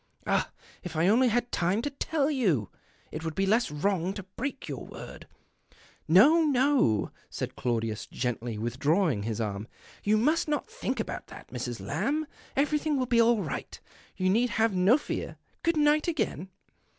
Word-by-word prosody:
Ah, -, -, +1 dB, 0.3 s
if 175 Hz, -3 st, -7 dB
I 160 Hz, +3 st, +3 dB
only 240 Hz, +6 st, +5 dB
had 240 Hz, +1 st, 0 dB
time 185 Hz, +6 st, +1 dB
to 290 Hz, -, -2 dB
tell 290 Hz, +1 st, 0 dB
you! 180 Hz, -, +1 dB, 0.4 s
It 155 Hz, -, -5 dB
would 160 Hz, -1 st, -4 dB
be 195 Hz, -, +1 dB
less 225 Hz, +5 st, +2 dB
wrong 180 Hz, +4 st, 0 dB
to 200 Hz, -, -6 dB
l)reak 275 Hz, +3 st, -4 dB
your -, -, -5 dB
word -, -, -10 dB, 0.3 s
" -, -, -29 dB
" -, -, -29 dB
No, 250 Hz, -, +7 dB
no," 265 Hz, -, +2 dB, 0.2 s
said -, -, -5 dB
Claudius, 115 Hz, -3 st, -2 dB
gently 120 Hz, -2 st, -3 dB
withdraw 140 Hz, -, +1 dB
ing 105 Hz, -6 st, -2 dB
his 110 Hz, +1 st, -3 dB
arm, 105 Hz, -1 st, -3 dB, 0.2 s
" -, -, -22 dB
you 210 Hz, +1 st, +3 dB
must 305 Hz, +10 st, +2 dB
not 300 Hz, -1 st, -1 dB
think 455 Hz, +3 st, -4 dB
about -, -, -4 dB
this, -, -, -11 dB
Mrs. -, -, -5 dB
Lamb. 305 Hz, +3 st, -1 dB, 0.3 s
Everything 300 Hz, +1 st, +1 dB
will 255 Hz, -, +1 dB
be 235 Hz, -2 st, +4 dB
all 230 Hz, -3 st, +3 dB
right. 155 Hz, -, -5 dB, 0.4 s
You 185 Hz, 0 st, +2 dB
need 240 Hz, +5 st, +3 dB
have 220 Hz, 0 st, +1 dB
no 190 Hz, +8 st, +5 dB
fear. 295 Hz, -, -5 dB, 0.2 s
Good 335 Hz, -1 st, +1 dB
night 300 Hz, +1 st, +3 dB
again." 230 Hz, -, -2 dB
210 Hz, 180 wpm, -28 LUFS, -, 0.4 s, No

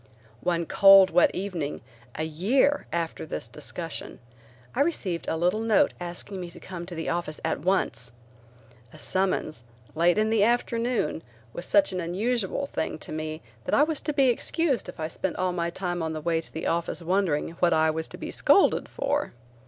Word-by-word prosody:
One 170 Hz, -1 st, 0 dB
cold, 195 Hz, +1 st, +7 dB
wet 180 Hz, -, +5 dB
evening, 180 Hz, -7 st, -4 dB, 0.3 s
a 155 Hz, -, -2 dB
year 215 Hz, -, +1 dB
after 170 Hz, -1 st, -2 dB
this 150 Hz, -, -5 dB
discussion, -, -, -5 dB, 0.6 s
I -, -, +1 dB
received 200 Hz, -, -1 dB
a 160 Hz, -, 0 dB
little 180 Hz, +6 st, +1 dB
note 225 Hz, -2 st, +3 dB
asking 175 Hz, +2 st, -4 dB
me 175 Hz, -, -6 dB
to 170 Hz, -, -12 dB
come 175 Hz, -2 st, -7 dB
to 180 Hz, -, -6 dB
the 165 Hz, -, -4 dB
office 170 Hz, -3 st, -2 dB
at -, -, 0 dB
once. 135 Hz, -9 st, 0 dB, 0.8 s
A -, -, -13 dB
summons, 185 Hz, -8 st, -1 dB, 0.3 s
late 170 Hz, +4 st, +3 dB
in 215 Hz, +1 st, +2 dB
the 220 Hz, -2 st, +4 dB
afternoon, 235 Hz, -6 st, 0 dB, 0.3 s
was 175 Hz, -, -6 dB
such 295 Hz, -9 st, +4 dB
an 185 Hz, -, -2 dB
unusual 210 Hz, +8 st, -1 dB
thing 220 Hz, -, -3 dB
to -, -, -6 dB
me 155 Hz, 0 st, -4 dB, 0.2 s
that -, -, +1 dB
I 290 Hz, -, +6 dB
was 310 Hz, -1 st, -1 dB
to 300 Hz, -, -1 dB
be 275 Hz, -3 st, +3 dB
excused 270 Hz, -, 0 dB
if 180 Hz, -, -10 dB
I 155 Hz, -, -1 dB
spent 175 Hz, +2 st, -3 dB
all 185 Hz, 0 st, 0 dB
my 170 Hz, -1 st, -1 dB
time 175 Hz, 0 st, -3 dB
on 160 Hz, 0 st, -2 dB
the 155 Hz, -, -4 dB
way 165 Hz, +1 st, 0 dB
to -, -, -5 dB
the 160 Hz, -, -5 dB
office 170 Hz, +1 st, -1 dB
wondering 175 Hz, -4 st, +1 dB
what 175 Hz, -1 st, +4 dB
I 160 Hz, 0 st, +3 dB
was 160 Hz, +1 st, -2 dB
to -, -, -9 dB
be -, -, -6 dB
scolded -, -, +4 dB
for. -, -, -1 dB
175 Hz, 190 wpm, -26 LUFS, 160-215 Hz, 0.8 s, cold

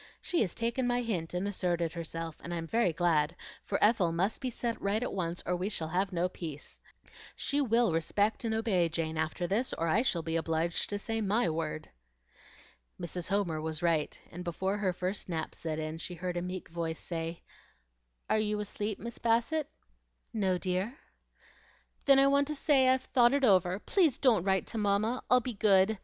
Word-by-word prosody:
She 345 Hz, -, 0 dB
has 185 Hz, -, 0 dB
taken 235 Hz, +2 st, 0 dB
my 245 Hz, 0 st, +1 dB
hint 180 Hz, -7 st, -3 dB
and 185 Hz, +3 st, -1 dB
asserted 175 Hz, -4 st, -1 dB
herself, 165 Hz, -1 st, -5 dB
and 175 Hz, +1 st, -4 dB
I'm 165 Hz, -1 st, -3 dB
very 225 Hz, 0 st, +2 dB
glad, 165 Hz, -1 st, +1 dB, 0.3 s
for 200 Hz, -, -1 dB
Ethel 205 Hz, -6 st, +4 dB
must 185 Hz, +6 st, 0 dB
be 260 Hz, -, -1 dB
set 235 Hz, -1 st, -3 dB
right 205 Hz, +4 st, 0 dB
at -, -, -3 dB
once 175 Hz, -2 st, -2 dB
or 180 Hz, -, 0 dB
we 185 Hz, +3 st, -2 dB
shall 160 Hz, -6 st, -3 dB
have 185 Hz, +4 st, 0 dB
no 175 Hz, 0 st, +1 dB
peace. 160 Hz, -5 st, -7 dB, 0.5 s
She 290 Hz, +1 st, 0 dB
will 235 Hz, -, +3 dB
respect 205 Hz, +8 st, +1 dB
and 225 Hz, -, -1 dB
obey 195 Hz, -7 st, +2 dB
Jane 160 Hz, 0 st, -2 dB
after 160 Hz, +3 st, -1 dB
this, 215 Hz, +8 st, 0 dB
or 165 Hz, -, -1 dB
I 195 Hz, +8 st, +3 dB
shall 175 Hz, -10 st, 0 dB
be 165 Hz, 0 st, -2 dB
obliged 165 Hz, +1 st, 0 dB
to 205 Hz, -, -1 dB
say 225 Hz, +2 st, -3 dB
MY 205 Hz, -2 st, +2 dB
word." 155 Hz, -1 st, -4 dB, 1.1 s
Mrs. 175 Hz, 0 st, -4 dB
Homer 190 Hz, -6 st, 0 dB
was 160 Hz, +1 st, -3 dB
right, 165 Hz, -3 st, +1 dB
and 175 Hz, +2 st, -7 dB
before 190 Hz, +3 st, -1 dB
her 195 Hz, -3 st, +1 dB
first 185 Hz, +2 st, -3 dB
nap 160 Hz, -2 st, -3 dB
set 160 Hz, -2 st, -4 dB
in 155 Hz, +1 st, -4 dB
she 175 Hz, +1 st, -5 dB
heard 180 Hz, +1 st, -4 dB
a 175 Hz, -, -1 dB
meek 180 Hz, +1 st, -5 dB
voice 165 Hz, -1 st, -3 dB
say, 165 Hz, 0 st, -4 dB, 0.8 s
"Are 215 Hz, -, +2 dB
you 210 Hz, -1 st, 0 dB
asleep, 210 Hz, 0 st, -3 dB
Miss 235 Hz, +1 st, -7 dB
Bassett?" 240 Hz, +7 st, +1 dB, 0.6 s
"No, 190 Hz, -4 st, +1 dB
dear." 185 Hz, +8 st, -2 dB, 1.1 s
"Then 275 Hz, -1 st, +7 dB
I 270 Hz, -, +6 dB
want 280 Hz, 0 st, +3 dB
to 300 Hz, -, -2 dB
say, 275 Hz, -2 st, +4 dB
I've 260 Hz, 0 st, +3 dB
thought 240 Hz, -1 st, +4 dB
it 280 Hz, -, 0 dB
over. 185 Hz, -4 st, +4 dB
Please 315 Hz, -, +2 dB
DON'T 225 Hz, -10 st, +3 dB
write 190 Hz, -1 st, +2 dB
to 225 Hz, -, -4 dB
mamma. 210 Hz, +4 st, +1 dB
I'll 250 Hz, 0 st, +6 dB
be 245 Hz, +1 st, -3 dB
good. 200 Hz, 0 st, +4 dB
190 Hz, 195 wpm, -31 LUFS, 170-225 Hz, 1.1 s, Then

